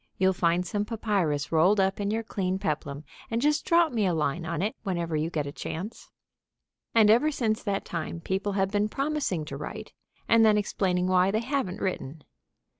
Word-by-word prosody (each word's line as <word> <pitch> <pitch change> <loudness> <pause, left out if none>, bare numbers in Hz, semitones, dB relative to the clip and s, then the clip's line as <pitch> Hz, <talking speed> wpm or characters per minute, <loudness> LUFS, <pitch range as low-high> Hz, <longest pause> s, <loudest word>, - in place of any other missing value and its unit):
You'll 190 0 +3
find 175 0 +1
some 205 +2 -1
papyrus 200 -10 -1
rolled 180 +6 +4
up 195 +1 +1
in 200 0 -1
your 225 +2 -1
clean 190 -3 -2
peplum, 150 -4 -3 0.3
and 230 - 0
just 300 +4 +1
drop 335 -1 +4
me 215 -4 +1
a 175 - +1
line 160 +2 -1
on 165 +2 -2
it 210 - -1
whenever 170 -5 -2
you 155 +2 0
get 155 -4 -2
a 140 - -5
chance." 185 +8 -6 0.9
And 215 -2 +7
ever 245 +8 +4
since 225 -7 -1
that 200 -2 -2
time 170 0 -4
people 190 +4 -2
have 195 -1 0
been 205 +1 +1
promising 275 - -1
to 140 -2 -6
write, 215 +9 -7 0.3
and 230 -1 +5
then 215 -1 +5
explaining 185 -3 0
why 185 0 +3
they 215 +3 0
haven't 255 -7 -2
written. 160 -5 -3
195 Hz, 190 wpm, -27 LUFS, 170-220 Hz, 0.9 s, And